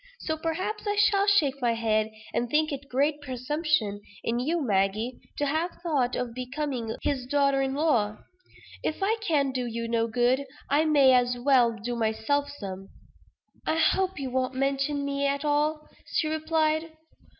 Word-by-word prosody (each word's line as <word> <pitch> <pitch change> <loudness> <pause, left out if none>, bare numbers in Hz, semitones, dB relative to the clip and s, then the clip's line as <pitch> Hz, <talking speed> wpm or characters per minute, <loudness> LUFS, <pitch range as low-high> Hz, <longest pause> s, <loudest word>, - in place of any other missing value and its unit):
So, 315 - -1
perhaps, 370 +7 -3
I 410 - +1
shall 405 -1 +3
shake 290 -9 +3
my 240 -1 +2
head, 220 -1 +1 0.2
and 240 - 0
think 310 +3 +2
it 280 0 -6
great 290 +3 +1
presumption 260 -5 -1 0.2
in 235 +1 0
you, 320 +7 0
Maggie, 215 0 0 0.2
to 290 - 0
have 315 +5 -1
thought 275 -7 +1
of 250 -2 -3
becoming 255 -2 -3
his 260 -3 -1
daughter 275 0 +2
in 270 0 -1
law. 235 -9 +1 0.6
If 315 +5 -2
I 435 +3 +2
can 295 -9 +1
do 250 -2 -2
you 230 0 -3
no 230 0 +1
good, 245 +4 +1 0.2
I 300 +3 +4
may 280 -4 +5
as 245 0 +3
well 245 -2 +4
do 240 +4 -4
myself 235 +6 0
some." 195 -8 -7 0.8
"I - - +2
hope 380 +3 +2
you 270 -3 -4
won't 255 0 -1
mention 275 +2 0
me 280 0 0
at 280 +1 -1
all," 300 +1 +1 0.3
she 310 - +2
replied. 315 0 0
275 Hz, 165 wpm, -27 LUFS, 245-310 Hz, 0.8 s, may